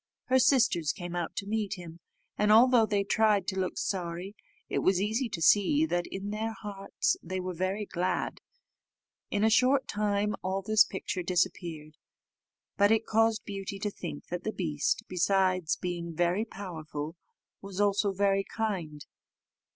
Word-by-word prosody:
Her 260 0 +5
sisters 230 - +3
came 175 -3 -6
out 175 -2 -3
to 200 - -3
meet 210 -2 -2
him, 170 -2 -10 0.4
and 210 0 +2
although 235 0 +6
they 205 -2 +1
tried 210 -1 +2
to 190 -1 -3
look 185 -1 -2
sorry, 180 +1 -3 0.3
it - - -1
was 190 -1 +2
easy 220 +5 0
to 165 -6 -3
see 250 - +4
that 175 - -1
in 195 +2 -5
their 220 +1 -2
hearts 205 -3 -2
they 185 +2 -4
were 185 0 -4
very 185 +4 -2
glad. 180 -1 -2 0.9
In 205 0 0
a 220 - +5
short 260 +4 +4
time 210 0 0
all 190 +1 -2
this 215 +1 +5
picture 190 -2 -4
disappeared, 170 -3 -2 0.8
but 205 0 +5
it 225 0 +3
caused 225 0 +2
Beauty 195 -1 -5
to 205 +1 -3
think 170 -6 -7
that 175 0 -3
the 215 - -1
beast, 155 -8 -1
besides 185 -1 +1
being 170 -2 -4
very 175 +6 +1
powerful, 160 -6 -6 0.5
was 195 -1 -7
also 205 0 +2
very 195 0 +2
kind. 185 -10 -4
195 Hz, 160 wpm, -29 LUFS, 175-210 Hz, 0.9 s, although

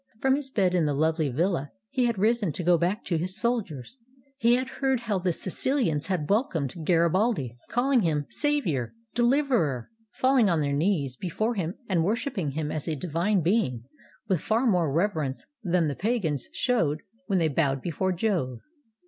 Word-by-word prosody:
From 265 +2 +3
his 280 -1 -4
bed 195 -8 +1
in 175 -3 +2
the 145 - 0
lovely 160 0 +1
villa 155 +1 0 0.2
he 260 -2 +1
had 235 -3 0
risen 215 -2 +2
to 180 - -4
go 175 +1 +5
back 175 +5 -1
to 170 - 0
his 185 +3 -3
soldiers. 225 - -2 0.4
He 235 0 +5
had 255 +1 -1
heard 265 -3 +2
how 215 -5 -1
the 180 0 0
SiciHans 185 - 0
had 180 -6 -1
welcomed 185 - 0
Garibaldi, 170 - +2
calHng 250 +1 +2
him 150 -5 0
"Sav 295 -1 +1
ior," 135 -9 -2 0.2
"Deliverer," 240 - +1 0.2
falling 255 -5 +3
on 165 -3 +2
their 140 -1 0
knees 145 -4 0
before 215 - -2
him 180 -4 -3
and 175 -4 +1
worshiping 205 - -1
him 150 0 -2
as 155 - -4
a 160 - -1
divine 175 +6 0
being, 165 - +1 0.4
with 185 -7 +1
far 225 +4 +1
more 180 - +2
reverence 160 -5 -1 0.2
than 175 -3 +2
the 145 - -1
pagans 175 - -1
showed 165 - 0 0.2
when 195 -3 +1
they 165 -2 +3
bowed 140 -2 +1
before 185 +2 -1
Jove. 175 - -1
180 Hz, 175 wpm, -27 LUFS, 155-230 Hz, 0.4 s, go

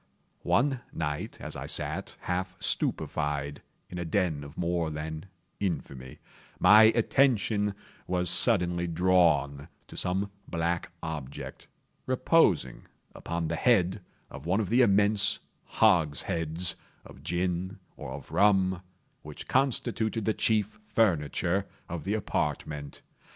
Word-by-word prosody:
One 135 -1 +2
night 75 -2 -4
as - - -7
I - - -6
sat, - - -2
half 90 +1 -3
stupefied, 75 -1 -1 0.3
in 90 - -7
a - - -2
den 85 -4 0
of 70 +2 -11
more 85 -2 0
than 80 +3 -6 0.3
infamy, 70 -9 -4 0.4
my 105 +4 +8
attention 110 -5 +2 0.3
was 90 -1 0
suddenly 90 -2 +3
drawn 80 -5 +2 0.2
to - - -13
some 95 +3 -1 0.2
black 85 0 -2
object, 75 -4 -6 0.4
reposing 125 - +2 0.3
upon 85 -1 -3
the 85 - -2
head 95 -1 +2 0.3
of 75 - -9
one 95 +4 +2
of 105 - -2
the 120 +4 +4
immense 105 -1 +3 0.3
hogsheads 80 +1 +1 0.3
of - - -13
gin, 90 +4 -2 0.2
or - - -8
of 70 -1 -10
rum, 95 -3 +3 0.4
which - - -10
constituted 115 -4 0
the 110 - +2
chief 110 - 0
furniture 95 - +1 0.2
of 85 -4 -6
the 105 - 0
apartment. 75 -6 -3
90 Hz, 120 wpm, -28 LUFS, 80-105 Hz, 0.4 s, my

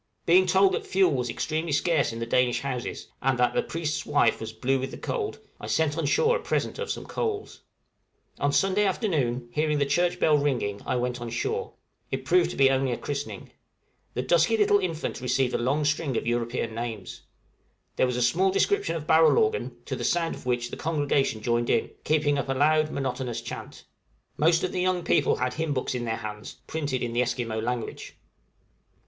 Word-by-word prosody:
Being 185 +2 +5
told 190 +1 +5
that - - -3
fuel 190 -2 +3
was 125 -2 -1
extremely 160 +4 -2
scarce 150 -1 +2
in 115 - -6
the 115 - -3
Danish 125 +1 +2
houses, 125 -3 -4
and 135 -1 +1
that 125 0 +2
"the - - +2
priest's 160 -2 -3
wife - - +2
was - - -5
blue 135 +1 0
with 130 +1 -3
the - - -8
cold," 430 -4 -3 0.2
I - - -7
sent 155 -2 +1
on 160 -3 -1
shore 470 - +3
a - - -8
present - - -2
of 475 - -4
some - - -4
coals. 425 -3 -4 0.8
On 145 - +1
Sunday 195 +6 +2
afternoon, 145 - 0
hearing 150 +2 +1
the 140 - +2
church 175 +5 +1
bell 150 -2 +4
ringing 120 -8 -1
I - - 0
went 125 0 -2
on 120 - -4
shore. 445 - -2 0.4
It - - -4
proved 365 -1 +3
to - - -6
be 135 -1 +5
only 135 -1 +1
a 120 - -1
christening. 140 -8 -5 0.6
The 125 - -1
little 150 +7 +4
dusky 165 +8 +3
infant 195 - +1
received 125 0 +1
a - - +1
long 140 +5 +1
string 145 -3 0
of - - -2
European 120 -1 -1
names. 115 -5 -5 0.8
There 130 - +3
was 125 -1 -2
a 125 - +2
small 185 +9 +3
description 405 - +1
of 155 -2 -5
barrel 160 +1 +5
organ, 445 0 0
to - - -3
the - - -5
sound 170 -1 +1
of - - -10
which 120 -1 -1
the - - -6
congregation 145 -7 0
joined 120 0 +1
in, - - +1
keeping 150 -2 +2
up 135 - -3
a - - +2
loud 155 +3 +3
monotonous 130 -4 -3
chant. - - -8 0.5
Most 165 +2 +3
of 185 - -1
the 180 - -1
young 180 -1 +1
people - - +3
had 125 - -1
hymn 155 -2 -2
books 130 - -1
in 120 -1 -3
their 110 -1 -1
hands, 105 -1 -7
printed 145 -5 -2
in 120 -1 -3
the 120 - +2
Esquimaux 120 -2 -2
language. 120 0 -4
140 Hz, 205 wpm, -26 LUFS, 125-165 Hz, 0.8 s, Being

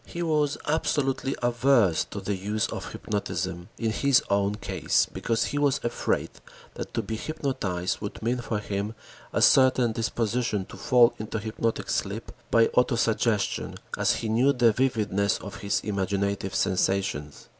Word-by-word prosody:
He 175 - -4
was 150 -3 +1
absolutely 135 -3 0
averse 120 -7 +3
to 100 - -7
the 100 +1 -2
use 105 +3 -1
of - - -6
hypnotism 85 +2 -3
in 115 -1 0
his 140 +3 +3
own 100 +1 +2
case 105 - +1
because 115 0 -1
he 145 - -2
was 145 -2 +2
afraid 120 - -1 0.4
that - - -7
to - - 0
be 110 - -4
hypnotized 110 - -2
would 105 - -5
mean 120 +2 0
for 115 -2 -2
him 105 +1 -3 0.4
a - - +1
certain 130 -3 +5
disposition 115 -2 -1
to - - -12
fall 125 -4 +5
into 110 +1 -4
hypnotic 110 +1 -2
sleep 105 +3 -2 0.2
by 115 -1 +5
auto 125 0 +3
suggestion, 110 -2 0 0.2
as - - +2
he 115 - -3
knew 120 +6 +3
the 120 -3 +4
vividness 105 -6 +1
of 100 - -8
his 100 -2 0
imaginative 100 -1 -1
sensations. 95 -7 -1
110 Hz, 155 wpm, -26 LUFS, 100-125 Hz, 0.4 s, certain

